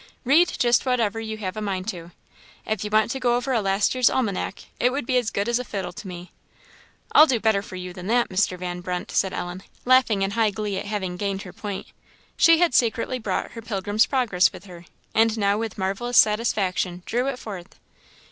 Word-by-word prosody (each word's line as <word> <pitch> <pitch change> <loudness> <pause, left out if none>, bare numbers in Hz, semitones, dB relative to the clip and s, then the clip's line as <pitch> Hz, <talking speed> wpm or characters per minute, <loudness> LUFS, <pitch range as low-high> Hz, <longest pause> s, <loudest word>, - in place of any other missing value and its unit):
Read 315 +8 +5
just 240 -1 +3
whatever 230 -4 0
you 220 -1 -5
have 195 -2 -4
a 215 - -4
mind 195 -2 -3
to. 175 -6 -5 0.6
If 215 -2 -2
you 210 - -3
was 215 +2 +2
to 265 - -3
go 240 -2 +2
over 250 +2 -1
a 230 - +2
last 195 +1 +1
year's 255 -2 +4
almanac 220 -8 -2 0.2
it 245 - +3
would 275 -1 -3
be 255 - 0
as 240 -3 +1
good 200 - -2
as 235 0 +1
a - - -3
fiddle 190 -6 -5
to 195 - -9
me." 180 0 -9 0.8
"I'll 310 - +8
do 250 -5 +1
better 220 -2 +2
for 200 -2 -10
you 180 0 -6
than 180 +1 -8
that, 240 +2 +2
Mr. 185 -1 0
Van 180 0 -5
Brunt," 180 0 -4
said 190 - +1
Ellen, 175 +1 -5 0.2
laughing 250 -6 +4
in 195 - -1
high 225 +1 +2
glee 205 -1 -3
at - - -6
having 190 -4 -3
gained 195 0 -2
her 180 - -10
point. 205 -2 -6 0.5
She 330 0 +6
had 345 -4 +2
secretly 235 +2 +1
brought 220 - -3
her 230 - -8
Pilgrim's 205 0 0
Progress 235 -9 +2
with 185 +1 -12
her, 175 -2 -12 0.3
and 225 0 +3
now 200 0 +1
with 225 -2 -4
marvellous 200 +5 -1
satisfaction 195 -5 +2
drew 245 +3 -1
it 275 -2 -2
forth. 195 -6 -9
210 Hz, 215 wpm, -24 LUFS, 190-240 Hz, 0.8 s, I'll